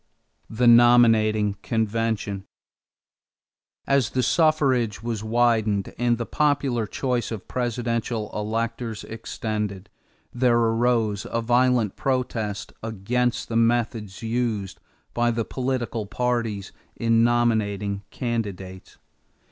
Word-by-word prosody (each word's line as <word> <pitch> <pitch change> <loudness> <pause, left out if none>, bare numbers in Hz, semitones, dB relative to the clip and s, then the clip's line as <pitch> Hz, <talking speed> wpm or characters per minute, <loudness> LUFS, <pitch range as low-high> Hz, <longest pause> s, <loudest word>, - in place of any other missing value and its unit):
=The 120 +3 0
Nominating 115 -3 +5
Convention.= 110 -3 -1 1.4
As 140 -4 +2
the 130 - 0
suffrage 130 - +2
was 115 -3 -3
widened 110 -3 +1
and 120 0 +1
the 120 - -3
popular 135 -7 0
choice 125 0 -2
of 110 -4 -6
presidential 115 -3 -2
electors 115 +1 -3
extended, 105 -3 -5 0.4
there 120 -1 +3
arose 115 -2 +1
a 115 - -1
violent 120 -2 +2
protest 115 -6 -2
against 115 +3 -1
the 115 - -4
methods 115 -3 0
used 115 -4 -2 0.3
by 120 0 +2
the 115 -1 -1
political 125 -4 -3
parties 115 -3 -2 0.2
in 115 0 +2
nominating 105 -4 +1
candidates. 100 -6 -5
115 Hz, 100 wpm, -24 LUFS, 105-120 Hz, 1.4 s, Nominating